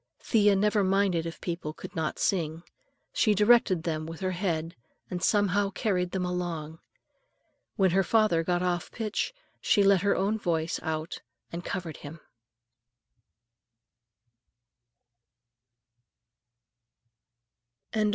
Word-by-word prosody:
Thea 205 -3 +3
never 210 +1 +2
minded 190 -3 +1
if 165 - -8
people 170 -3 -4
could - - -10
not 160 -1 -2
sing; 165 -3 -1 0.5
she 215 -3 +3
directed 210 -5 +4
them 155 -2 -2
with 165 0 -8
her 185 0 0
head 170 -3 -2 0.4
and 180 -1 -3
somehow 205 0 +2
carried 185 -3 -1
them 185 0 -2
along. 170 -3 -4 1.0
When 190 -2 +3
her 190 +2 +3
father 195 -4 +2
got 175 +1 0
off 175 -1 -1
the - - -17
pitch 220 - -2 0.3
she 205 - +3
let 195 -2 +5
her 200 +1 +2
own 205 +3 0
voice 165 -3 -1
out 160 0 -4 0.3
and 170 +1 -5
covered 170 -4 -5
him. 150 +3 -10
180 Hz, 115 wpm, -28 LUFS, 165-200 Hz, 1.0 s, let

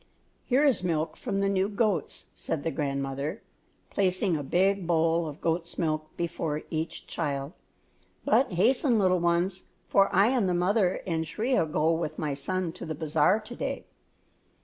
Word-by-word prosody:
"Here 265 +3 +3
is 265 -10 +3
milk 165 -3 -1
from 205 -6 -3
the 195 0 +1
new 195 0 +1
goats," 210 -2 -1
said 155 - -3
the 165 - -1
grandmother, 140 +4 -3 0.5
placing 185 -1 +1
a 150 - -2
big 185 +5 +1
bowl 165 0 +2
of 150 0 -8
goat's 170 +1 -1
milk 155 -2 -2
before 165 -3 -2
each 160 0 -3
child; 140 -3 -3 0.7
"but 260 -5 +3
hasten, 240 - +3
little 185 -3 +3
ones, 175 +2 +1 0.2
for 195 0 +4
I 200 +5 +5
and 240 -7 +2
the 180 - +1
mother 185 +1 +1
and 165 -3 -1
Shriya 215 +3 0
go 155 +1 +1
with 160 -2 -2
my 150 -2 -2
son 180 +5 -2
to 170 - -8
the 155 - -3
Bazaar 160 +6 +2
to 240 +3 -10
day. - - -4
175 Hz, 165 wpm, -28 LUFS, 155-195 Hz, 0.7 s, I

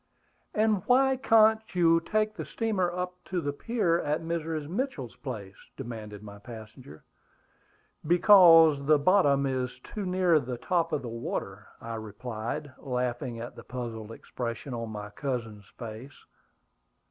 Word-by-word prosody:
"And 215 -2 +2
why 265 +1 +4
can't 220 -3 +5
you 165 -2 +5
take 215 +5 0
the - - -5
steamer 205 -6 -1
up 180 0 -5
to 185 - -2
the 145 -3 -2
pier 175 -1 0
at 150 +1 -1
Mrs. 165 -2 -3
Mitchell's 175 - -3
place?" 110 -8 -7 0.2
demanded 105 -3 -7
my 100 -1 -10
passenger. 110 - -11 1.0
"Because 170 -5 +7
the 155 0 +6
bottom 145 -4 +3
is 130 -2 -2
too 205 -3 -5
near 180 -3 +3
the 125 -3 -5
top 165 +4 0
of 150 -3 -1
the - - -5
water," 110 -3 -5
I 115 0 -6
replied, 110 +4 -5
laughing 125 -2 -3
at 120 +1 -7
the - - -11
puzzled 115 -3 -6
expression 115 +2 -6
on 115 -1 -4
my 105 -1 -7
cousin's 115 -5 -4
face. 115 +4 -9
140 Hz, 140 wpm, -28 LUFS, 115-180 Hz, 1.0 s, Because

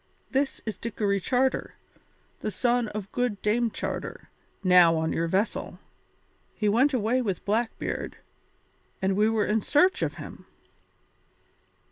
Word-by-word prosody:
This 275 +1 0
is 220 - -4
Dickory 205 -3 -1
Charter, 260 +6 0 0.6
the - - -2
son 240 +2 +1
of 210 -2 -6
good 245 -5 -1
Dame 230 +3 +2
Charter, - - -5 0.3
now 180 -3 +6
on 160 0 0
your 165 - 0
vessel. 195 +6 -1 0.8
He 210 - 0
went 245 +8 +4
away 250 0 +1
with 195 -7 -3
Blackbeard, 225 +3 -2 0.8
and 190 0 +1
we 210 +2 +3
were 220 -2 +1
in 215 +1 +1
search 335 - +3
of - - -1
him." - - -10
215 Hz, 130 wpm, -27 LUFS, 200-245 Hz, 0.8 s, now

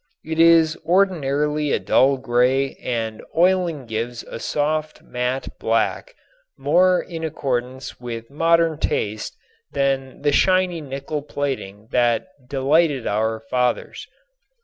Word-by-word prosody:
It 160 +1 -3
is 165 -1 +6
ordinarily 150 -5 +1
a - - +3
dull 135 +1 +3
gray 130 +2 +1
and 115 -3 -3
oiling 175 -5 +2
gives 115 +2 -4
a - - -8
soft 155 +4 -2
mat 125 +2 -3
black - - 0 0.4
more 185 0 +3
in 165 -2 -7
accordance 130 -4 -3
with 115 0 -7
modern 165 +1 +2
taste 105 -6 -2 0.4
than 135 -1 -1
the 145 - +3
shiny 185 +1 +2
nickel 140 +1 -5
plating 130 -8 -4
that 120 +3 +2 0.2
delighted 140 0 +2
our 110 +2 0
fathers. 125 +2 -2
140 Hz, 115 wpm, -22 LUFS, 125-160 Hz, 0.4 s, is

